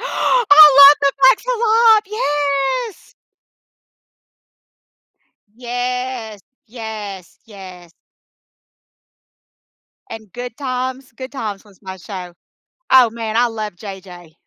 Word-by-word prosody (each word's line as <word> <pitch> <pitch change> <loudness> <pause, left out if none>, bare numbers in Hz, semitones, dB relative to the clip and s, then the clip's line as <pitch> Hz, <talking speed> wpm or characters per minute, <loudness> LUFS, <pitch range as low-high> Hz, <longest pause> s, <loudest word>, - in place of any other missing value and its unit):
I 385 - +4
love 280 +1 +9
The 280 -1 +1
Facts 265 - +4
of - - -2
Life! 450 -1 +3
Yes. 295 - -3 2.4
Yes. 245 -2 -5 0.3
Yes, 215 -5 -9
yes. 185 -5 -13 2.2
And 220 -4 -11
Good 245 -1 -8
Times, 260 -1 -5
Good 260 +2 -10
Times 215 -7 -7
was 200 -3 -23
my 190 -1 -9
show. 180 -1 -10 0.6
Oh, 255 -3 +5
man, 225 -1 -6
I 245 +1 +2
love 215 -3 -6
JJ. 180 -4 -12
245 Hz, 95 wpm, -17 LUFS, 210-280 Hz, 2.4 s, love